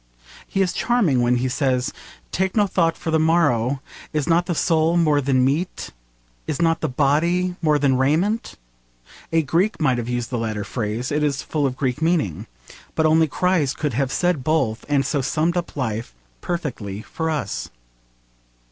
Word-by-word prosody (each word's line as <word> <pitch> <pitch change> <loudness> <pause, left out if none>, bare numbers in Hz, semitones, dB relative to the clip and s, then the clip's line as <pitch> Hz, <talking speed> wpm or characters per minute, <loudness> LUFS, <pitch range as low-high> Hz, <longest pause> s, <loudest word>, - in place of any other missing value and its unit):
He 195 - +1
is 180 - -1
charming 200 - +2
when 120 +1 +3
he 125 +1 0
says, 130 0 0 0.4
'Take 190 0 -1
no 210 -2 +4
thought 170 -4 +1
for 160 - -4
the 160 - +3
morrow; 145 -5 +2 0.3
is 150 -2 -1
not 175 +1 +2
the 175 - -1
soul 165 +1 +2
more 155 -4 +3
than 130 -1 +2
meat? 155 +7 -2 0.6
is 150 - -2
not 165 -1 +2
the - - 0
body 170 +7 +1
more 155 -3 +3
than 140 -2 +2
raiment?' 175 +12 +1 0.8
A 165 -1 +3
Greek 175 +9 +1
might 130 -6 +2
have 120 0 -4
used 120 -1 -2
the 120 - -1
latter 110 -2 -2
phrase. 110 +4 -3
It 150 +1 +1
is 145 -2 0
full 150 -3 0
of 130 -1 -5
Greek 130 0 -1
feeling. 160 - 0 0.5
But 160 - +2
only 160 +1 +4
Christ 165 -3 +1
could 150 -4 -1
have 135 +2 0
said 175 -7 0
both, 135 -8 0
and 140 -1 +2
so 140 +1 0
summed 160 +6 0
up 175 -1 -3
life 115 - -3 0.3
perfectly 115 - -4
for 160 -1 -3
us. 145 -11 -3
150 Hz, 175 wpm, -22 LUFS, 130-165 Hz, 0.8 s, no